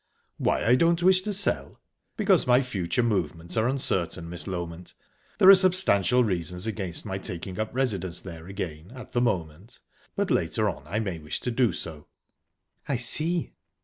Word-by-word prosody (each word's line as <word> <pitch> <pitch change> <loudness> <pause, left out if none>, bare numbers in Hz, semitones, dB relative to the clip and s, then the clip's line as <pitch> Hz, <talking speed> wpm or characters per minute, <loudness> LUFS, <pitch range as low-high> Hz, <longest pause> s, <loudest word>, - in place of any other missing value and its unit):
"Why - - +1
I 120 - +5
don't 170 +6 +3
wish 185 0 +5
to 210 - -3
sell? 200 0 -1 0.4
Because 195 -8 +3
my 125 +2 +5
future 115 -1 -1
movements 90 -7 -2
are 110 +1 +2
uncertain, 95 -10 -1
Miss 85 -3 -7
Loment. 85 -2 -6 0.4
There 185 - +5
are 195 - +12
substantial 175 - +3
reasons 90 -3 -2
against 95 -6 -3
my 95 0 -3
taking 90 -1 -6
up 110 - -1
residence 100 -9 -1
there 85 -3 -9
again 85 -2 -6
at 130 - -10
the 120 - +1
moment, 95 -2 -2 0.4
but - - -1
later - - +1
on - - -11
I 100 - -3
may 95 -7 -3
wish 75 -1 -4
to 125 - -2
do 120 -1 +2
so." 80 -3 -7 0.8
"I 140 - 0
see." 155 +8 0
105 Hz, 170 wpm, -26 LUFS, 85-130 Hz, 0.8 s, are